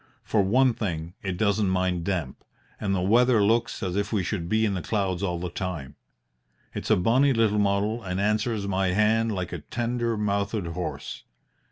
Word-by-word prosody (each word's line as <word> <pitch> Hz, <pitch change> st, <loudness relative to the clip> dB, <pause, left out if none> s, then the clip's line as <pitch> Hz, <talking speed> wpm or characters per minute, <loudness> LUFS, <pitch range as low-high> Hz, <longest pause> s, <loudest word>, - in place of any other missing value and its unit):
For 105 Hz, -, +2 dB
one 125 Hz, +6 st, +3 dB
thing, 85 Hz, -6 st, -4 dB
it 95 Hz, -3 st, -3 dB
doesn't 100 Hz, -1 st, +2 dB
mind 90 Hz, -2 st, 0 dB
damp, 85 Hz, -9 st, -3 dB, 0.4 s
and 95 Hz, -2 st, 0 dB
the 90 Hz, -, 0 dB
weather 115 Hz, +2 st, +4 dB
looks 115 Hz, +3 st, +1 dB
as 90 Hz, -1 st, -2 dB
if 100 Hz, 0 st, -1 dB
we 105 Hz, -4 st, +1 dB
should 85 Hz, -3 st, -3 dB
be 110 Hz, 0 st, +2 dB
in 105 Hz, -, 0 dB
the 90 Hz, -, -2 dB
clouds 95 Hz, -2 st, -1 dB
all 90 Hz, -3 st, -1 dB
the 90 Hz, 0 st, -4 dB
time. 80 Hz, -8 st, -5 dB, 0.8 s
It's -, -, -5 dB
a -, -, +6 dB
bonny 130 Hz, +9 st, +3 dB
little 110 Hz, -3 st, +2 dB
model 105 Hz, +3 st, +1 dB
and 90 Hz, -2 st, -3 dB
answers 105 Hz, 0 st, 0 dB
my 95 Hz, 0 st, +1 dB
hand 110 Hz, +2 st, +2 dB
like 90 Hz, -4 st, -3 dB
a 85 Hz, -, -4 dB
tender 120 Hz, +7 st, -2 dB
mouthed 100 Hz, -1 st, -1 dB
horse. 85 Hz, +1 st, -5 dB
100 Hz, 185 wpm, -26 LUFS, 90-110 Hz, 0.8 s, a